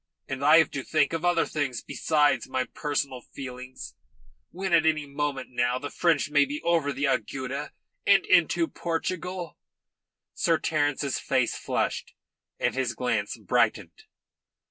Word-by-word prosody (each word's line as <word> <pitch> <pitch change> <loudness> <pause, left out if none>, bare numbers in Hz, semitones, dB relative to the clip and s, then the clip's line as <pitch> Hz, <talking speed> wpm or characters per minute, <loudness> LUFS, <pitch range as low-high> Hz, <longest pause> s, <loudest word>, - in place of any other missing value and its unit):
And 135 +1 -4
I 150 +3 +7
have 160 -3 +4
to 135 - -3
think 155 +2 +1
of 165 0 -2
other 175 -1 +3
things 140 -6 -2
besides 150 -2 +1
my 130 -1 0
personal 140 -2 -3
feelings, 130 0 -9 0.6
when 190 0 -3
at 165 -2 +6
any 155 -2 +2
moment 140 -2 -3
now 125 0 +1
the 145 +2 -6
French 160 -4 +1
may 145 -1 +5
be 145 +2 -4
over 165 -4 +2
the 140 +1 -4
Agueda 135 +2 -2 0.4
and - - +5
into 335 - +3
Portugal." 175 - -4 0.7
Sir 165 -1 +2
Terence's 145 -3 0
face - - 0
flushed, - - -2 0.4
and - - 0
his 125 -3 -1
glance 110 -5 -1
brightened. - - 0
145 Hz, 145 wpm, -27 LUFS, 130-160 Hz, 0.7 s, I